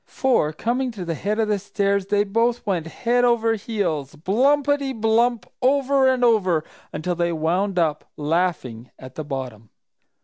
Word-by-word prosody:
For 245 - +1
coming 245 +10 -1
to 190 -5 -6
the 165 - -2
head 205 +6 -2
of 220 -1 +1
the 210 -1 0
stairs, 200 0 -1
they 205 0 +2
both 230 +4 0
went 180 -5 -1
head 240 +8 0
over 230 -2 +3
heels, 185 - -3
"blumpity, 275 - +1
blump!" 225 -1 +2 0.2
over 270 +1 +3
and 260 -1 +2
over, 185 -9 +2 0.3
until 160 +4 -3
they 170 0 0
wound 180 +5 -1
up, 155 -3 0
laughing, 150 -7 -2
at 130 0 -11
the 155 - -5
bottom. 130 -7 -6
200 Hz, 160 wpm, -22 LUFS, 160-235 Hz, 0.3 s, over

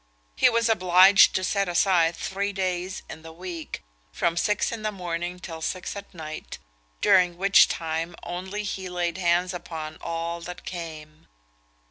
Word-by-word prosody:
He - - +5
was 230 0 +2
obliged 185 -2 +6
to 185 - 0
set 200 0 0
aside 175 -2 +3
three 200 +4 -2
days 185 -1 -2
in 160 - -9
the 160 0 -10
week, 170 - -7 0.3
from 165 - 0
six 210 +4 +1
in 230 -2 -5
the 215 0 -1
morning 175 -2 -4
till 165 -3 -8
six 180 +4 -3
at 200 - -9
night, 155 -3 -8 0.4
during 180 -4 +4
which 195 +2 +6
time 165 +1 -3
only 190 +4 -5
he 190 -2 -4
laid 175 0 -2
hands 180 +1 +2
upon 160 -3 -6
all 170 0 -3
that 175 +1 -8
came. 155 -3 -8
180 Hz, 155 wpm, -25 LUFS, 165-190 Hz, 0.4 s, obliged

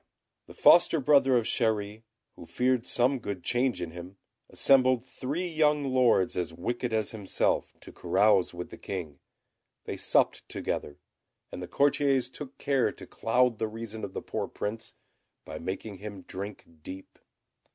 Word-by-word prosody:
The - - -13
foster 170 -2 +6
brother 135 -2 +4
of 115 - 0
Chéri, 110 -3 -1 0.3
who 85 - -12
feared 125 -1 0
some 130 +2 +2
good 100 -5 -5
change 120 0 0
in 85 - -6
him, 90 +3 -10 0.3
assembled 130 -2 +4
three 145 +7 -4
young 150 -3 +2
lords 130 -8 +3
as 90 -2 -2
wicked 120 +8 -3
as 110 -2 0
himself 105 -4 0
to - - -11
carouse 100 -3 +2
with 90 0 -7
the - - -10
King. 85 -7 -6 0.7
They - - -5
supped - - +1
together; 70 - -4 0.5
and - - -7
the 90 - -6
courtiers 140 -1 +2
took 140 -1 -9
care 135 -3 +1
to - - -12
cloud 120 0 +1
the 110 - 0
reason 110 0 -7
of 95 - -5
the - - -5
poor - - -3
Prince, 110 +2 -6 0.5
by - - -7
making 95 +3 -5
him 100 -2 -8
drink 100 +2 -7 0.2
deep. 95 +4 -10
115 Hz, 155 wpm, -28 LUFS, 100-130 Hz, 0.7 s, foster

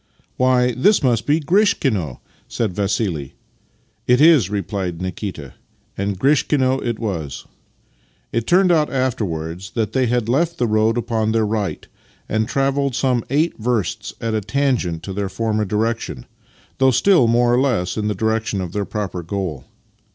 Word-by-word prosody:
" - - -38
Why, 125 -1 +3
this 140 - +3
must 120 -4 +1
be 150 +2 +3
Grishkino," 140 - +1 0.3
said 110 -5 -2
Vassih. 95 - -2 0.4
" 115 -2 -41
It 125 - +5
is," 150 - +6
replied 95 -3 -3
Nikita: 90 - -5 0.4
and 100 0 -2
Grishkino 135 0 +2
it 120 -2 -2
was. 85 -11 -4 0.9
It 115 0 -2
turned 185 +1 +4
out 155 -3 +2
afterwards 95 -9 -2
that 110 -2 -1
they 130 -1 +2
had 120 -2 0
left 165 +7 +1
the 125 - +1
road 110 +1 +2
upon 110 -2 0
their 110 -1 +2
right, 105 -2 -2 0.4
and 110 0 0
travelled 135 0 0
some 125 -3 +1
eight 150 +3 0
versts 115 -3 -2
at 115 -1 -2
a 110 - 0
tangent 115 - -1
to 95 - -5
their 100 0 -2
former 110 0 -1
direction 110 - -2 0.3
— - - -32
though 130 0 +5
still 130 - +4
more 120 +1 +3
or 125 - +3
less 110 -10 0
in 105 -1 -1
the 105 - -1
direction 110 0 -1
of 90 -3 -4
their 100 +1 -2
proper 95 -4 -4
goal. 85 -5 -4
110 Hz, 165 wpm, -20 LUFS, 100-130 Hz, 0.9 s, is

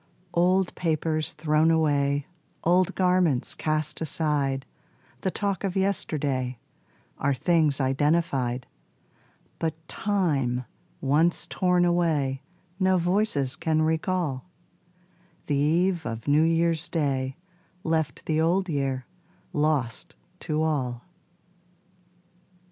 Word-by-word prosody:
Old 180 +2 +2
papers 155 -2 -1
thrown 155 0 +2
away, 145 -3 +2 0.4
Old 180 +1 +3
garments 180 -8 +2
cast 155 0 -2
aside, 145 -4 0 0.6
The 190 - 0
talk 200 0 -2
of 195 -1 -2
yesterday, 145 -10 0 0.6
Are 140 0 +1
things 155 0 +2
identified; 135 -2 +1 0.9
But 160 -2 -1
time 145 -12 0 0.4
once 155 +5 +2
torn 180 -1 +2
away 155 -6 +1 0.4
No 185 -1 +3
voices 175 -7 0
can 155 0 +1
recall: 160 -2 -1 1.0
The 150 - -1
eve 170 +4 +2
of 115 -2 -5
New 145 +2 +4
Year's 165 0 +1
Day 135 -5 -1 0.5
Left 160 -2 -1
the 155 0 +1
Old 185 +4 +2
Year 135 -4 -1 0.5
lost 150 -7 -1 0.2
to 155 0 -1
all. 130 -6 -1
155 Hz, 100 wpm, -26 LUFS, 140-175 Hz, 1.0 s, New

